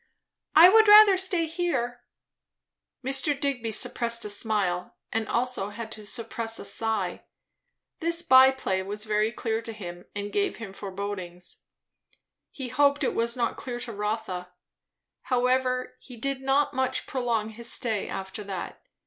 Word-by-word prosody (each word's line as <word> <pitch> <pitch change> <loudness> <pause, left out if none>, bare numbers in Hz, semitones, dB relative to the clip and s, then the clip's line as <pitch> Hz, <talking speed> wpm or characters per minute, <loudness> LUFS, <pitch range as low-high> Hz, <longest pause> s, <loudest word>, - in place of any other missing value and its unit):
"I 330 +3 +10
would 440 +3 +6
rather 420 -1 +9
stay 370 -3 0
here." 310 -8 -2 1.0
Mr. 270 +2 +2
Digby 260 -5 -1
suppressed 235 +2 0
a 210 - -2
smile, 200 -4 0 0.2
and 225 -1 -1
had - - -5
also 240 -5 0
to 220 -1 -8
suppress 225 0 -3
a - - -8
sigh. 225 -1 -2 0.8
This 335 +1 +2
by 260 -4 +8
play 225 -8 -2
was 205 +2 -4
very 215 0 +1
clear 225 -1 -2
to 230 - -7
him, 175 -5 -9
and 205 0 -5
gave 405 -1 0
him 220 -4 -8
forebodings. 190 -3 -6 0.9
He 265 -3 -7
hoped 285 +3 +2
it - - 0
was 235 +2 0
not 235 -1 -1
clear 245 -2 -5
to 240 - -5
Rotha. 210 -4 -4 0.7
However, 255 0 0
he 250 -3 -13
did 275 +3 -2
not 270 +2 +1
much 260 0 -1
prolong 235 -4 -1
his 230 +2 -4
stay 220 -5 -1
after 190 +2 -6
that. 190 -3 -6
235 Hz, 150 wpm, -26 LUFS, 210-265 Hz, 1.0 s, I